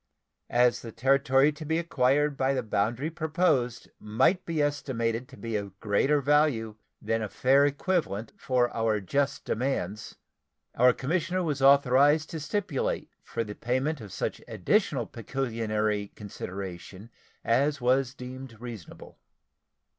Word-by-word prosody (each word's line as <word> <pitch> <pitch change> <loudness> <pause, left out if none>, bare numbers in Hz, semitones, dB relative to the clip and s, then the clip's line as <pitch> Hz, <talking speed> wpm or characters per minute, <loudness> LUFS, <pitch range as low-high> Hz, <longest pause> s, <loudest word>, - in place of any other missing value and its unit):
As 120 0 +3
the 115 - -8
territory 135 +4 +3
to 150 +1 -9
be 160 +1 0
acquired 145 -2 +1
by 135 0 +1
the 130 - -1
boundary 115 +8 -1
proposed 155 -7 0
might 115 - +1
be 165 -2 -2
estimated 125 -5 -1
to - - -13
be 115 -1 -4
of 100 -1 -5
greater 125 +8 +2
value 140 -6 +2 0.3
than 115 0 -1
a 105 - -3
fair 135 +6 +4
equivalent 145 - -2
for 125 -2 0
our 110 -2 +1
just 140 +8 -1
demands, 110 -5 -2 0.6
our 125 +1 +5
commissioner 180 +7 -1
was 145 -5 -2
authorized 140 +3 +5
to 160 - -4
stipulate 210 - -2
for 115 - -3
the 105 -1 -7
payment 130 +6 -1
of 105 -3 -10
such - - -3
additional - - +1
pecuniary 110 -5 -2
consideration 95 0 -8 0.3
as 140 +5 +2
was 130 +1 +1
deemed 125 -2 -9
reasonable. 115 -7 -10
130 Hz, 130 wpm, -28 LUFS, 115-145 Hz, 0.6 s, our